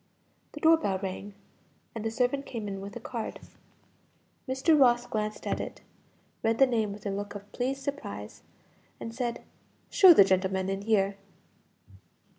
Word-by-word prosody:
The 300 - -7
door 320 +1 +6
bell 200 -11 -1
rang 195 +1 -6 0.6
and 225 - -5
the 225 - 0
servant 250 +4 0
came 225 -4 -5
in 195 -1 -5
with 200 +1 -8
a - - -5
card. 230 0 -5 1.1
Mr. 265 +5 +3
Ross 245 -4 +4
glanced 215 -2 -3
at - - -1
it, - - -6 0.6
read 225 0 +1
the 270 - +7
name 225 -5 0
with 205 +1 -10
a 200 - -1
look 205 +1 -5
of 205 0 -10
pleased 270 +2 -2
surprise, 105 - -6 0.6
and 230 - -6
said, 240 -1 -3 0.5
"Show 370 -4 +8
the 200 - +9
gentleman 190 0 +1
in 195 0 -2
here." 200 -2 +1
220 Hz, 160 wpm, -28 LUFS, 200-255 Hz, 1.1 s, the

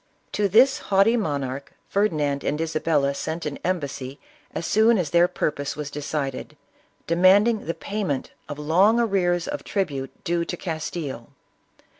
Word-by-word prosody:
To 205 -1 +1
this 255 +7 +5
haughty 200 +4 +3
monarch 140 - -3
Ferdinand 150 -9 0
and 150 - -1
Isabella 155 -3 +1
sent 160 +4 -4
an 145 -2 -4
embassy 140 -6 -3 0.3
as 160 - -4
soon 220 +2 +4
as 165 -7 -1
their 175 +1 +5
purpose 145 -4 -2
was 150 -1 -5
decided, 145 -2 -4 0.5
demanding 195 +6 +4
the 165 - -2
payment 200 -10 -3 0.2
of 145 - -5
long 185 +10 +3
arrears 180 -6 +1
of 290 0 -4
tribute 145 -10 -3
due 170 0 0
to 175 - -5
Castile. 155 -7 -5
165 Hz, 140 wpm, -24 LUFS, 145-200 Hz, 0.5 s, this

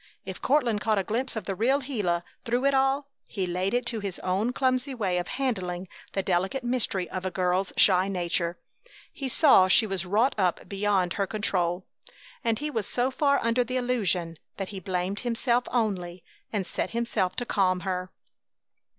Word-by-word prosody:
If 190 -1 -7
Courtland 245 -7 +2
caught 215 -1 +2
a 195 - +1
glimpse 235 +7 -2
of 220 - -3
the 195 - -3
real 250 +8 +2
Gila 205 -11 -1 0.2
through 245 +3 0
it 275 - +4
all 270 +1 +2 0.2
he 190 -3 -2
laid 180 +4 -1
it 245 0 0
to 235 -2 -2
his 200 -3 -4
own 195 +6 0
clumsy 260 +1 0
way 190 -6 0
of 175 - -4
handling 190 -9 -2 0.3
the 195 - 0
delicate 190 +8 0
mystery 240 -7 0
of 185 - -4
a 190 - -1
girl's 185 +1 0
shy 185 -1 +5
nature. 175 -2 -1 0.6
He 270 -2 -4
saw 255 - +6
she 205 +4 +5
was 195 -3 -2
wrought 215 +8 +2
up 180 -3 +1
beyond 195 -3 +1
her 200 - 0
own - - -16
control, 185 -4 -1 0.6
and 225 -1 +1
he 300 +1 -3
was 220 -6 -2
so 250 +2 +1
far 280 +1 +3
under 230 +2 +2
the 255 +2 -3
illusion 195 -10 0 0.2
that 195 -1 -4
he 195 - -6
blamed 185 +2 -2
himself 240 0 0
only, 185 -7 -1 0.3
and 205 -4 -1
set 185 - -2
himself 230 -5 -1
to 245 - -2
calm 185 -5 +1
her. 185 -1 -3
205 Hz, 185 wpm, -27 LUFS, 185-245 Hz, 0.6 s, saw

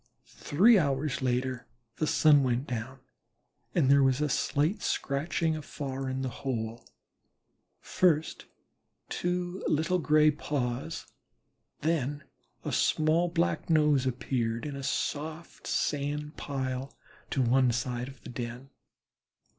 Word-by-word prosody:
Three 205 +9 +4
hours 140 -2 0
later 125 -1 -1 0.3
the 155 - 0
sun 150 -2 +5
went 125 0 0
down 125 +2 -5 0.7
and 155 -6 +3
there 140 +1 +6
was 135 0 +3
a 150 0 +1
slight 150 +9 0
scratching 155 +3 0
afar 135 -3 -5
in 130 0 -2
the - - -1
hole; 115 -3 -3 1.0
first 160 -4 +1 0.6
two 180 +1 -2
little 160 +4 +1
gray 155 -1 +5
paws, 140 +1 -3 0.8
then 145 -2 0 0.4
a - - -2
small 160 +3 +2
black 170 0 0
nose 150 -4 +4
appeared 115 -1 -1
in 145 -2 -4
a 140 - -5
soft 155 +4 -3
sand 150 +1 -1
pile 130 -1 -4 0.3
to 135 - +1
one 125 +1 +4
side 125 +1 -2
of 135 -6 -13
the - - -9
den. 120 +2 -6
140 Hz, 120 wpm, -29 LUFS, 130-155 Hz, 1.0 s, there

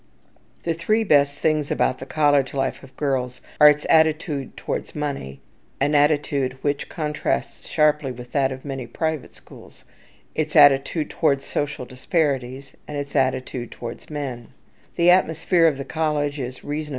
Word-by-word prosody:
The 165 - 0
three 215 +7 +1
best 145 -6 +3
things 155 -1 0
about 130 - 0
the 130 - -8
college 145 -3 +2
life 135 -1 -1
of 135 -1 -16
girls 130 -3 -1 0.2
are 150 0 +10
its 150 0 +1
attitude 155 -3 +2
towards - - -4
money 135 - -4 0.4
(an 145 +2 +1
attitude 145 -3 +2
which 145 -1 -1
contrasts 150 -2 -3
sharply 150 -3 +2
with 125 0 -10
that 135 -2 +1
of 130 +1 -8
many 135 -3 -5
private 160 +3 -3
schools), - - -16 0.5
its 155 -1 -2
attitude 145 +1 +5
towards 140 -1 +1
social 145 -3 -3
disparities, 130 -1 -2
and 150 - -5
its 145 0 -5
attitude 130 -2 -1
towards 120 0 -8
men. 135 -6 -5
140 Hz, 125 wpm, -23 LUFS, 130-150 Hz, 0.5 s, are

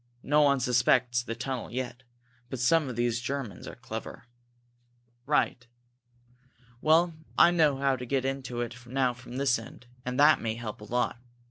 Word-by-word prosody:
No 150 +2 +3
one 140 -2 +4
suspects 125 -1 +2
the 115 -1 -5
tunnel 130 0 -4
yet, 125 0 -5 0.5
but 130 - -4
some 135 +4 +3
of 125 - -5
these 120 0 0
Germans 130 -6 -5
are - - -8
clever." - - -8 1.0
"Right! 125 -4 +1 1.1
Well, 165 +2 +4 0.2
I 170 - +7
know 155 -5 +3
how 135 0 +2
to 125 - -6
get 130 0 0
into 130 -3 -3
it 120 +1 -6
now 130 0 +1
from 125 0 -10
this 135 -3 +2
end, 115 +2 -12 0.2
and 125 +2 -3
that 150 +1 +6
may 110 -1 -2
help 115 -2 -7
a - - -8
lot. 120 +1 -1
125 Hz, 165 wpm, -28 LUFS, 120-140 Hz, 1.1 s, I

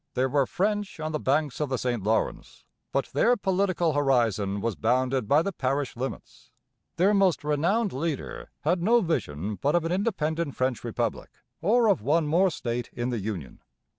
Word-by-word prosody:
There 130 +1 +1
were 140 -1 +2
French 205 -1 -1
on 155 0 -3
the 155 - -2
banks 145 0 0
of 150 -2 -1
the 130 - 0
St 120 -3 -1
Lawrence, 110 +3 -2 0.3
but 135 - -1
their 240 - +3
political 185 -4 +1
horizon 115 -8 +1
was 115 0 -2
bounded 125 +1 +1
by 150 +6 +4
the 200 - -2
parish 140 -3 -2
limits. 130 +3 -7 0.5
Their 195 +4 +3
most 195 -6 +3
renowned 175 +9 +1
leader 150 +1 -4
had 175 +3 +1
no 230 +6 +4
vision 105 - -2
but 145 +3 +2
of 170 -1 +2
an 165 - -1
independent 170 - -1
French 130 -2 -1
republic, - - -3 0.3
or 225 +6 +3
of 200 -4 +3
one 155 +7 +2
more 175 +6 +3
state 120 -6 -4
in 120 +1 -2
the 120 - -2
Union. 95 - -6
150 Hz, 175 wpm, -27 LUFS, 125-180 Hz, 0.5 s, by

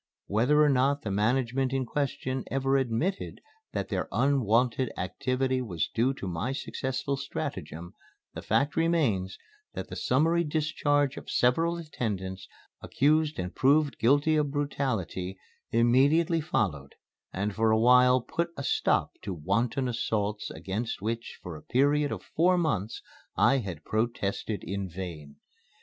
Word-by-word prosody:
Whether 125 +9 +2
or 150 - +4
not 140 +2 +2
the 105 - -3
management 125 +5 +1
in 135 -1 0
question 130 -1 -2
ever 135 0 +1
admitted 135 - -1 0.3
that - - -3
their - - -2
unwonted 125 -2 +2
activity 130 +7 -1
was 90 -10 -3
due 120 +4 +2
to 100 - -6
my 90 +9 -2
successful 135 0 -3
stratagem, 85 - -5 0.4
the - - -6
fact 140 +1 +1
remains 140 - +1 0.4
that - - -5
the - - -6
summary 165 +6 +2
discharge 145 -2 0
of - - -8
several 165 +8 +2
attendants 100 - -4 0.3
accused 155 +2 +2
and 90 -1 -4
proved 145 +2 +2
guilty 145 +6 +3
of 150 -1 +1
brutality 120 - -2 0.3
immediately 140 +8 +3
followed 85 - -2 0.4
and 100 +2 -2
for 110 +2 +2
a 110 - +4
while 125 +2 +5
put 170 +8 -2
a 140 - -4
stop - - +1
to 95 -3 -4
wanton 115 - 0
assaults 105 -3 -2
against 105 +2 -4
which 115 +2 -3
for 90 -3 -6
a 75 - -10
period 145 +3 +2
of - - -5
four 180 +3 +2
months 130 - -1 0.3
I 135 - +4
had 90 -9 -6
protested 110 -2 -2
in 100 0 -4
vain. 80 -5 -7
125 Hz, 140 wpm, -28 LUFS, 100-145 Hz, 0.4 s, while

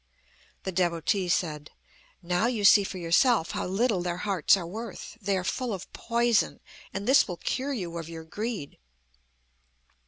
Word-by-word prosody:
The 190 - -3
Devotee 175 +1 0
said: 155 -4 -1 0.5
"Now 180 +6 +1
you 225 -5 -1
see 205 0 +8
for 195 - -5
yourself 175 +3 +3
how - - -3
little 200 +1 +1
their 175 0 -2
hearts 195 -2 +4
are 180 - -5
worth. 220 +8 -7
They 200 -1 0
are 185 - -2
full 235 +3 -2
of 185 - -11
poison, 235 -6 +1 0.3
and 200 - -5
this 275 +2 +6
will 175 -3 -5
cure 270 +9 -2
you 175 -8 -4
of 165 0 -7
your 165 -1 -7
greed." 205 -2 -5
190 Hz, 160 wpm, -27 LUFS, 170-225 Hz, 0.5 s, see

